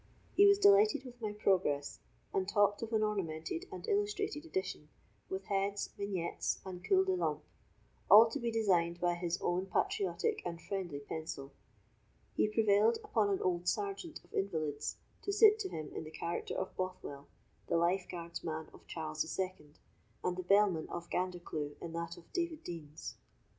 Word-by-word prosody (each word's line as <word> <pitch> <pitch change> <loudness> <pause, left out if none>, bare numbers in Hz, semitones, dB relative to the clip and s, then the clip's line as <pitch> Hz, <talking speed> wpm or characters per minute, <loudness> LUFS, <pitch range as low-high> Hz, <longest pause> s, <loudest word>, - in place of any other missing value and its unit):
He 405 - +8
was 400 0 +7
delighted 405 -6 +5
with 245 -1 -11
my 215 -2 -1
progress, 185 -9 +1 0.3
and 190 0 0
talked 205 0 +3
of 230 0 -4
an 220 -1 +2
ornamented 195 - -2
and - - -7
illustrated 410 -6 0
edition, 190 - -3 0.4
with 190 0 -4
heads, 200 +1 -1
vignettes, 190 -4 -2
and 180 -1 -7
culs 380 -1 +4
de 380 - +1
lampe, 360 - -1 0.7
all 220 +3 +10
to - - -2
be 235 - -1
designed 180 -7 +2
by 175 0 +2
his 175 0 -2
own 180 +2 0
patriotic 410 - 0
and 170 -1 -4
friendly 175 -7 -4
pencil. 140 -2 -6 0.8
He - - +3
prevailed 215 +1 +4
upon 210 -3 +2
an 195 - 0
old 175 -1 0
sergeant 390 - -2
of - - -23
invalids 155 -6 -1 0.2
to 400 - -2
sit 425 +1 +7
to 390 -3 -2
him 155 - -5
in - - -4
the 155 - -8
character 170 +2 -3
of 190 - -3
Bothwell, 180 -6 -5 0.4
the - - +2
lifeguard's 170 -1 -1
man 160 -1 -4
of - - -16
Charles 155 -1 -4
the - - 0
Second, 165 -4 -4 0.5
and 180 - 0
the 185 - -3
bellman 190 -3 +3
of 170 0 -6
Gandercleugh 175 -5 -2
in 165 -1 -6
that 170 0 -4
of 175 - -12
David 340 -3 -2
Deans. 160 -3 -7
190 Hz, 170 wpm, -34 LUFS, 170-230 Hz, 0.8 s, all